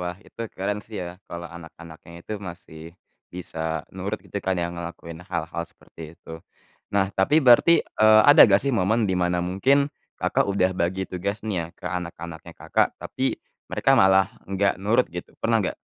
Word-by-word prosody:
Wah, 90 0 -4
itu - - -14 0.2
keren 100 +2 -2
sih 105 +1 -10
ya - - -6 0.2
kalau 85 0 -7
anak-anaknya 85 0 -13
itu - - -6 0.2
masih 85 -2 -11 0.5
bisa 80 -2 -4
nurut 95 +3 -4
gitu - - -8
kan 95 -1 -1
ya 85 0 -2
ngelakuin 85 -1 -8
hal-hal 85 -2 -4
seperti 80 -1 -13
itu. 80 0 -11 0.5
Nah 100 -1 +3
tapi 95 +10 +1
berarti, 130 +7 +6
eee, 110 0 +5
ada 145 +2 +8
gak 100 0 +5
sih 140 - +1
momen 110 +1 +2
di 95 - 0
mana 90 0 +1
mungkin, 140 +11 +2 0.2
Kakak, - - 0
udah 95 -2 +2
bagi 95 +3 0
tugas 100 +4 -4
nih 105 -4 -2
ya 85 - -4
ke - - -19
anak-anaknya, 85 -2 -8
Kakak, - - 0
tapi - - -3 0.3
mereka 135 - +2
malah 95 0 +4 0.2
enggak 100 +1 +1
nurut 110 +5 +2
gitu, 90 - -6
pernah 115 -1 +1
nggak? 95 - -2
95 Hz, 175 wpm, -24 LUFS, 85-105 Hz, 0.5 s, ada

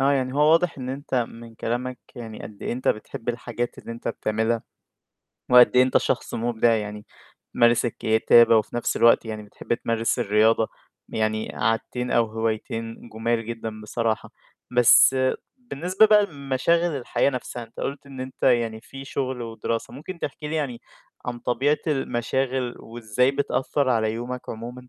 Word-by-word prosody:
آه، 140 +1 +4
يعني 130 -1 0
هو - - -1
واضح 165 -3 +2
إن 125 - -5
أنت 135 +1 -5
من 115 -1 -3
كلامك 125 +2 -3 0.2
يعني 115 -3 -8
قد 105 - -10
إيه - - -2
أنت 125 +2 -2
بتحب 110 +2 -3
الحاجات 120 0 -3
اللي 115 - -7
أنت 115 - -6
بتعملها 110 +1 -1 0.9
وقد 125 0 +7
إيه 125 - +7
أنت 130 - +3
شخص - - -1
مُبدع 115 0 +2
يعني 105 -1 -5 0.5
تمارس 120 0 +4
الكتابة 115 0 +4
وفي 110 - -2
نَفْس 120 - -1
الوقت 115 0 +5
يعني 110 -1 -5
بتحب 105 +3 -4
تمارس 115 -1 -1
الرياضة 110 +2 +3 0.4
يعني 110 0 -1
عادتين 125 +2 -1
أو 120 - +4
هوايتين 115 +1 -4
جُمال 115 +1 -1
جدًا 110 -2 -6
بصراحة. 110 +1 -2 0.4
بس 125 +2 +6 0.4
بالنسبة 185 - +2
بقى 210 -1 +5
لمشاغل 150 +2 0
الحياة 130 +2 +1
نفْسها، 125 -2 -5
أنت 115 0 -13
قُلت 140 +1 -4
إن 135 -2 -10
أنت 130 0 -7
يعني 115 -3 +2
في 135 +2 -10
شُغل 130 -3 -3
ودراسة، 115 0 -4
ممكن 170 +5 -8
تحكي 150 0 -5
لي 160 - -3
يعني 135 -6 -3 0.4
عن 120 -1 -4
طبيعة 135 +6 +1
المشاغل 130 -2 -1
وإزاي 120 +3 0
بتأثّر 140 -1 0
على 110 -2 +1
يومك 125 +2 -6
عمومًا؟ 115 +2 -6
120 Hz, 155 wpm, -24 LUFS, 115-130 Hz, 0.9 s, وقد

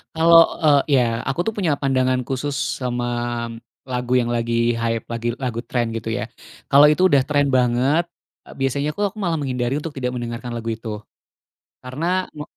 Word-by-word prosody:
Kalau, 165 +1 +6 0.3
eee 145 -2 +6 0.2
iya, - - +4 0.3
aku 135 +4 -2
tuh 225 - -1
punya 175 -6 +1
pandangan 130 -2 +1
khusus 135 +2 -2 0.3
sama 120 -1 -2 0.9
lagu 125 0 -2
yang 120 -1 -1
lagi 115 0 -1 0.3
hype, 115 -1 -1
lagi 115 0 -3 0.2
lagu 115 -1 -3
tren 120 -2 0
gitu 115 0 -4
ya. - - -2 0.5
Kalau 145 +1 +7
itu 155 - 0
udah 140 -3 +5
tren 145 -1 +2
banget, 125 +6 +2 0.4
eee, - - -12
biasanya 140 +2 0
aku 205 - -6
aku - - -18
malah 165 -2 0
menghindari 125 -2 -2
untuk 155 0 -6
tidak 125 -1 -1
mendengarkan 120 0 -5
lagu 115 0 -4
itu. 115 0 -8 1.0
Karena 170 +8 -1
me 150 - -6
130 Hz, 170 wpm, -21 LUFS, 120-150 Hz, 1.0 s, Kalau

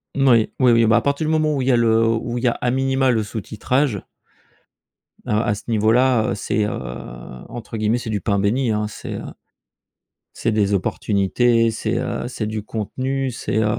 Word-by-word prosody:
N 135 -1 +2
oui, 115 -3 +4
oui, 125 -2 +5
oui. 115 -1 +5
Bah, 110 - +4
à - - +2
partir 140 +2 0
du 155 - +1
moment 155 -1 +2
où 135 - -1
il 130 - -2
y - - +5
a - - +5
le 115 -1 +3
où 115 +2 -1
il 120 - -4
y - - +3
a, - - +4
à 125 - -1
minima, 135 0 +2
le 110 -2 +1
sous 105 +1 -5
titrage 125 +2 -1 1.2
heu, - - -4
à 105 -2 0
ce - - -10
niveau-là, 115 +2 +3
heu, - - -1
c'est, 105 +1 -1
heu, - - -1 0.8
entre 115 -1 -7
guillemets, 110 +2 +1
c'est 120 - -6
du 105 -2 -2
pain 100 +2 0
béni, 115 +5 +1
hein, 105 0 0
c'est - - -7 1.2
c'est - - -1
des 105 -2 +1
opportunités. 115 +4 +1
C'est, 110 +1 -2
heu, 120 -1 -3
c'est 115 -3 -4
du 110 -1 -4
contenu, 130 +5 -3
c'est, 115 - -3
heu 110 - +2
115 Hz, 210 wpm, -21 LUFS, 110-130 Hz, 1.2 s, oui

